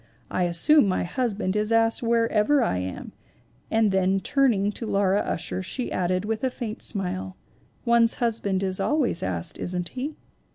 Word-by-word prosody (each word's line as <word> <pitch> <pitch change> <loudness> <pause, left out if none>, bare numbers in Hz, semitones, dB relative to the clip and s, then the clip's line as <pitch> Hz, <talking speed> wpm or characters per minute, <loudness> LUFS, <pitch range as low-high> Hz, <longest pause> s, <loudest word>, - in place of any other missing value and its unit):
'I 180 - +1
assume 200 - +5
my 185 - 0
husband 205 -1 -2
is 210 +1 0
asked 225 0 +3
wherever 230 +3 +2
I 90 - 0
am/ 90 0 -6 0.6
and 220 -2 +2
then 190 0 +2
turn 275 +4 +3
ing 200 -1 0
to 225 +2 -6
Laura 200 -1 +2
Ussher 170 +1 -3
she 240 +7 -4
added 185 +2 0
with 220 +2 -3
a 260 - +2
faint 235 -3 -6
smile: 185 -2 -4 0.5
'One's 235 -1 +4
husband 210 -5 -1
is 190 -1 -2
always 295 - +1
asked, 90 -3 -3
isn't 180 -1 -3
he? 275 +4 -5
210 Hz, 165 wpm, -25 LUFS, 185-235 Hz, 0.6 s, assume